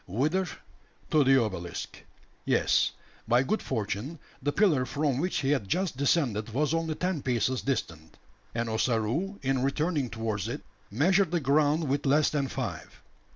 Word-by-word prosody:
Whither? 155 - 0 0.6
To 155 -2 +5
the 135 0 +5
obelisk. 90 -7 -4 0.5
Yes, - - +2 0.3
by 120 +3 +4
good 215 +11 -1
fortune, 115 +5 -3 0.2
the 145 - 0
pillar 160 -8 +3
from 140 0 -1
which 180 +4 0
he 135 0 +1
had 130 -9 0
just 180 - 0
descended 130 -6 +1
was 150 +2 +1
only 165 -1 -1
ten 180 -3 -1
paces 125 0 0
distant; 85 - -3 0.4
and 115 0 -1
Ossaroo, 115 - 0
in 135 -1 +1
returning 145 0 0
towards 110 -3 -3
it, - - -5 0.3
measured 175 - +3
the 175 +1 +1
ground 150 +2 +2
with 140 +1 0
less 150 +2 +4
than 140 -3 0
five. - - -6
135 Hz, 155 wpm, -28 LUFS, 115-155 Hz, 0.6 s, To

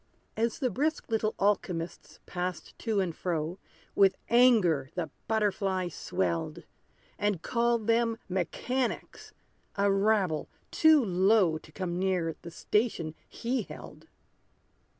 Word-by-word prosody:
As 230 +1 0
the 255 -5 0
brisk 295 +2 -1
little 220 -1 0
alchymists 180 -4 -1
passed 180 -1 -4
to 220 -3 0
and 180 -4 -1
fro, 170 0 -2 0.3
With 195 -1 +4
anger 215 - +4
the 165 -5 -3 0.2
butterfly 195 -4 0
swelled; 85 - -2 0.6
And 205 -5 0
called 235 -2 +1
them 230 0 +2
mechanics 230 +8 -2 0.4
a 200 0 +2
rabble 195 -6 +1 0.2
too 315 -5 +5
low 185 -3 +3
To 155 - -17
come 175 0 -3
near 180 -4 0
the 170 - -8
station 170 -4 -1 0.2
he 245 +2 -2
held. - - -11
195 Hz, 115 wpm, -29 LUFS, 175-225 Hz, 0.6 s, too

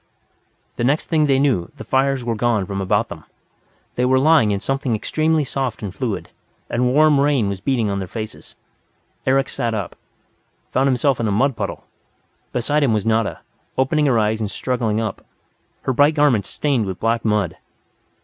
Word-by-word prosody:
The - - -1
next 140 +5 +1
thing 155 -2 +3
they 135 -1 +3
knew, 130 -11 +1
the - - -7
fires 135 -1 +1
were 120 -1 -1
gone 115 -3 +1
from 100 +1 -4
about 95 - +1
them. - - -9 0.7
They 125 - -1
were 130 +1 +3
lying 150 -4 +4
in 100 -1 0
something 135 0 -1
extremely 155 +7 +1
soft 130 -5 -3
and 100 -3 -4
fluid; 110 -7 -3 0.4
and 125 +1 +1
warm 150 +1 +5
rain 140 -6 +2
was 100 -1 -4
beating 115 +1 0
in 100 -1 -1
their 95 - -4
faces. 110 +2 -8 0.7
Eric 135 +1 +3
sat 115 -1 -2
up, 100 -4 -4 0.8
found 135 +1 +2
himself 135 +1 +2
in 115 - 0
a - - 0
mud 130 +6 +2
puddle. - - -4 0.7
Beside 145 +5 0
him 135 -6 +3
was 105 -2 0
Nada, 110 -1 0 0.4
opening 145 +3 +2
her 125 -4 +3
eyes 110 0 +1
and 105 - -2
struggling 115 -2 -1
up, 110 -3 -4 0.6
her 130 - 0
bright 145 +4 +4
garments 140 - +2
stained 135 -8 0
with 95 -1 -5
black 115 +1 0
mud. 105 -6 0
120 Hz, 180 wpm, -20 LUFS, 110-135 Hz, 0.8 s, warm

